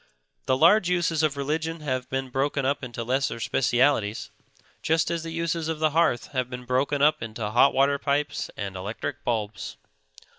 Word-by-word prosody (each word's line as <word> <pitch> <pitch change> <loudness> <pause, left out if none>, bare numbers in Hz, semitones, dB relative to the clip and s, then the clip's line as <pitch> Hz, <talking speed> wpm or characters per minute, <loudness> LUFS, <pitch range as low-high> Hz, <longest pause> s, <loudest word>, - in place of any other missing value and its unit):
The 130 - +3
large 175 +5 +5
uses 170 -3 +1
of 150 -3 +1
religion 155 +3 -2
have 130 -4 -3
been 135 0 -2
broken 135 +1 0
up 140 +1 0
into 120 -2 -5
lesser 130 0 -1
specialities, 120 -2 +1 0.5
just 160 +1 +1
as 170 -1 -1
the 165 - -6
uses 165 -1 -2
of 160 -1 -2
the 155 0 +1
hearth 160 -6 +1
have 130 -3 -1
been 125 -1 -7
broken 135 +3 +1
up 150 +1 +4
into 110 -1 -4
hot 125 +4 +5
water 140 +1 +2
pipes 145 +2 -1
and 100 -2 -4
electric 100 +4 -5
bulbs. 105 - -3
140 Hz, 175 wpm, -26 LUFS, 120-155 Hz, 0.5 s, large